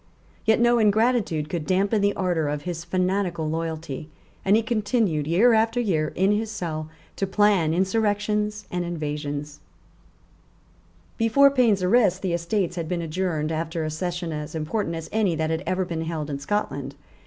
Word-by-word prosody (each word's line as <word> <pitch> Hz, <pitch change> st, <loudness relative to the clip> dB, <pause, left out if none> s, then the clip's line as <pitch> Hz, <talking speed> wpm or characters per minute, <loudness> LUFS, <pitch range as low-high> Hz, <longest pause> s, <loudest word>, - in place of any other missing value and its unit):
Yet 220 Hz, 0 st, +4 dB
no 240 Hz, 0 st, +4 dB
ingratitude 215 Hz, -7 st, +2 dB
could 160 Hz, -2 st, -4 dB
damp 195 Hz, +2 st, +2 dB
the 205 Hz, -2 st, +2 dB
ardour 175 Hz, -5 st, 0 dB
of 145 Hz, 0 st, -3 dB
his 175 Hz, -2 st, -4 dB
fanatical 180 Hz, -2 st, -1 dB
loyalty; 160 Hz, -2 st, -4 dB, 0.3 s
and 195 Hz, +2 st, +4 dB
he 225 Hz, -, +3 dB
continued, 210 Hz, -, 0 dB
year 210 Hz, +9 st, +5 dB
after 225 Hz, +2 st, +2 dB
year, 160 Hz, -10 st, 0 dB
in 190 Hz, +3 st, +3 dB
his 215 Hz, +1 st, 0 dB
cell, 160 Hz, -7 st, -4 dB, 0.3 s
to 195 Hz, -, 0 dB
plan 195 Hz, -5 st, +3 dB
insurrections 210 Hz, +2 st, 0 dB
and 180 Hz, 0 st, -1 dB
invasions, 150 Hz, -3 st, -4 dB, 1.6 s
Before 275 Hz, +5 st, +5 dB
Payne's 230 Hz, -8 st, +3 dB
arrest 190 Hz, -2 st, +3 dB
the 185 Hz, -3 st, 0 dB
Estates 175 Hz, +1 st, -1 dB
had 165 Hz, -2 st, -3 dB
been 175 Hz, -2 st, -1 dB
adjourned 160 Hz, -2 st, -2 dB
after 165 Hz, +1 st, -2 dB
a 155 Hz, -, -2 dB
Session 175 Hz, +1 st, -3 dB
as 150 Hz, +1 st, -5 dB
important 165 Hz, +3 st, -2 dB
as 165 Hz, 0 st, -6 dB
any 205 Hz, -6 st, +1 dB
that 160 Hz, 0 st, -1 dB
had 160 Hz, +1 st, -1 dB
ever 185 Hz, 0 st, 0 dB
been 165 Hz, -2 st, -4 dB
held 160 Hz, -2 st, -3 dB
in 140 Hz, -, -3 dB
Scotland. 140 Hz, -5 st, -3 dB
180 Hz, 165 wpm, -24 LUFS, 160-210 Hz, 1.6 s, year